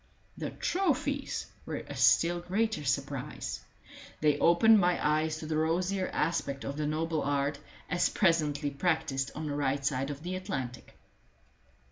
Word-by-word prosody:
The - - -4
trophies 290 -6 -1 0.2
were - - -5
a - - -6
still 175 +1 +4
greater 210 +1 -1
surprise. 135 - -2 0.6
They 150 -1 +2
opened 215 +6 +6
my 180 -1 +3
eyes 155 +1 +1
to 155 - -7
the 155 0 -1
rosier 180 +4 0
aspect 140 -3 -1
of 140 - -4
the 150 0 -1
noble 160 +1 -1
art, 140 +1 0 0.3
as 180 - +2
presently 150 -5 +1
practised 140 -3 0
on 155 - -4
the 145 - -2
right 140 -1 0
side 135 -1 0
of 145 +1 -6
the 180 +1 -3
Atlantic. 135 - -5
155 Hz, 145 wpm, -30 LUFS, 145-180 Hz, 0.6 s, opened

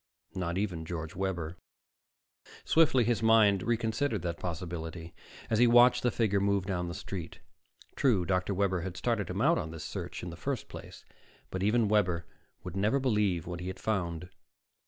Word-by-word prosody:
Not 90 -1 -2
even 95 -5 -2
George 80 -1 -5
Webber. 90 -3 -3 1.1
Swiftly 155 -6 +4
his 115 0 +1
mind 110 -3 +5
reconsidered 115 - -1
that 85 -1 -3
possibility 85 -1 -5 0.3
as 110 - +1
he 120 - +6
watched 120 +1 +6
the 125 - +2
figure 110 -4 +1
move 100 -1 +1
down 90 -3 -2
the 85 - -5
street. 90 -4 -6 0.6
True, 115 -11 +2
Dr. 90 +2 0
Webber 95 -2 +1
had 90 0 -5
started 115 -5 -1
him 95 +3 -2
out 165 +6 +4
on 80 - -4
this 80 -1 -7
search - - -6
in - - -5
the - - -8
first - - -4
place. - - -10 0.5
But 95 - -3
even 110 +3 +3
Webber 90 -5 +1 0.4
would 90 -1 -7
never 105 +8 +2
believe 105 - +1
what 85 0 -5
he 90 - -6
had 95 - -5
found. 90 -5 -2
95 Hz, 175 wpm, -30 LUFS, 85-110 Hz, 1.1 s, he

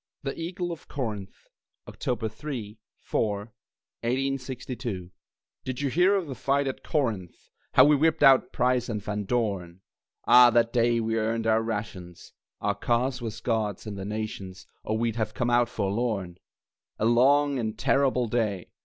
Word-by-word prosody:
THE 135 - -3
EAGLE 175 +1 -4
OF 165 - -8
CORINTH 105 -8 -5 0.4
[October 120 -3 -3
3, 115 -3 -7 0.2
4, 105 -2 -1 0.6
1862] 125 -6 -3 0.5
Did 130 +1 -4
you 140 -2 0
hear 180 +6 +4
of 190 -3 0
the 135 - -5
fight 140 +2 0
at 135 - -4
Corinth, 110 - -2 0.2
How 130 - +8
we 150 +1 +5
whipped 160 +3 +2
out 135 -1 +6
Price 125 -1 +1
and 110 -2 -2
Van 105 0 -4
Dorn? 95 -6 -2 0.4
Ah, 125 0 +8
that 115 0 +2
day 120 -1 +3
we 115 0 0
earned 115 +1 -1
our 110 0 +3
rations 105 -6 -6 0.3
(Our 105 0 +1
cause 125 +4 0
was 115 -1 -5
God's 110 -4 -1
and 105 -2 -5
the 95 - -6
Nation's, 100 -3 -5 0.2
Or 110 - -1
we'd 115 0 -1
have 110 -1 -2
come 120 -1 0
out 120 0 +3
forlorn!) 100 -4 -2 0.6
A 110 - 0
long 135 +4 +4
and 110 -2 -3
terrible 130 -1 +2
day! 105 -5 -1
115 Hz, 155 wpm, -27 LUFS, 105-130 Hz, 0.6 s, How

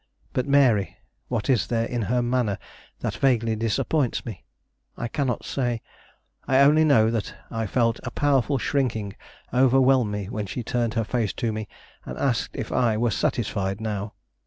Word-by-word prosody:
But 125 - -1
Mary? 130 -8 +3 0.3
What 115 -4 -2
is 125 -7 +2
there 115 -1 0
in 120 0 -2
her 125 0 +2
manner 120 -4 0 0.4
that - - -3
vaguely 115 -4 +2
disappoints 115 +5 0
me? 110 -6 -7 0.5
I 115 - -3
cannot 130 -1 -2
say. 120 -4 -2 0.6
I 130 - +3
only 150 +3 +6
know 115 -8 +4
that 115 -3 -3 0.2
I 115 -1 -2
felt 115 +1 +1
a 125 - -5
powerful 140 0 +1
shrinking 115 -7 -1 0.4
overwhelm 130 -2 +4
me 105 -2 -4
when 105 -1 -4
she 120 +6 -4
turned 115 0 -1
her 115 - +1
face 110 -2 -1
to 115 - -1
me 110 -1 -4 0.4
and - - -7
asked 125 -5 -1
if - - -4
I 115 -4 +2
were 120 +1 +1
satisfied 100 -2 -1
now. 105 -1 -4
115 Hz, 165 wpm, -25 LUFS, 110-130 Hz, 0.6 s, only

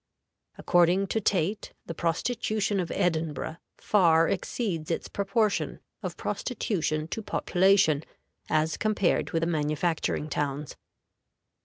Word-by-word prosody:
According 175 +2 +3
to 220 - 0
Tait, 195 +1 0
the 165 - -5
prostitution 205 +4 -1
of 175 - -2
Edinburgh 160 -2 -1 0.2
far 165 -5 +4
exceeds 185 -4 -2
its 165 - -2
proportion 200 +1 0 0.2
of - - -5
prostitution 165 - -2
to 225 - -3
population 190 -6 +3 0.5
as 155 +1 +1
compared 210 -4 +1
with 165 - 0
the - - +2
manufacturing 155 0 0
towns. 145 -1 -3
170 Hz, 110 wpm, -27 LUFS, 155-200 Hz, 0.5 s, far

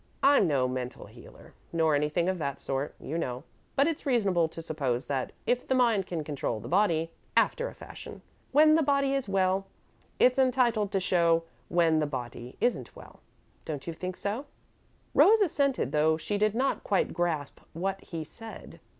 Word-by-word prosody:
I'm 275 -8 +5
no 135 -4 +2
mental 125 -1 -5
healer, - - -15 0.2
nor 160 -2 +2
anything 150 +4 +1
of 185 -1 -1
that 140 -3 -3
sort, 135 +1 -3
you 160 +4 -4
know, 125 -3 -3 0.3
but 275 - +4
it's 325 -1 -2
reasonable 200 - +2
to 160 - -10
suppose 140 -6 -2
that 135 -3 -2
if 245 +1 0
the 260 - +2
mind 230 -7 +3
can 165 -3 -3
control 140 -6 -3
the 110 - -9
body, 165 -1 +2 0.3
after - - +2
a - - -9
fashion, - - -10 0.3
when 310 +3 +6
the 320 - +4
body 275 -2 +2
is 270 -7 -1
well, 190 0 +1 0.5
it's 255 +1 +4
entitled 240 -5 +2
to - - +2
some 185 - -5
show 170 -2 +3 0.3
when 165 -2 +3
the 150 - 0
body 125 -2 -6
isn't 245 - -1
well, - - -14 0.4
don't 145 -4 -5
you 170 - -4
think 185 +2 -5
so?" 225 +8 -3 0.7
Rose 440 +3 +6
assented, 280 -7 +1
though 155 +1 +3
she 205 +6 -3
did 215 0 +2
not 265 +3 0
quite 200 - +1
grasp 160 -5 -2
what 195 +3 -2
he 165 -3 -5
said. 225 +8 -11
180 Hz, 180 wpm, -28 LUFS, 150-240 Hz, 0.7 s, when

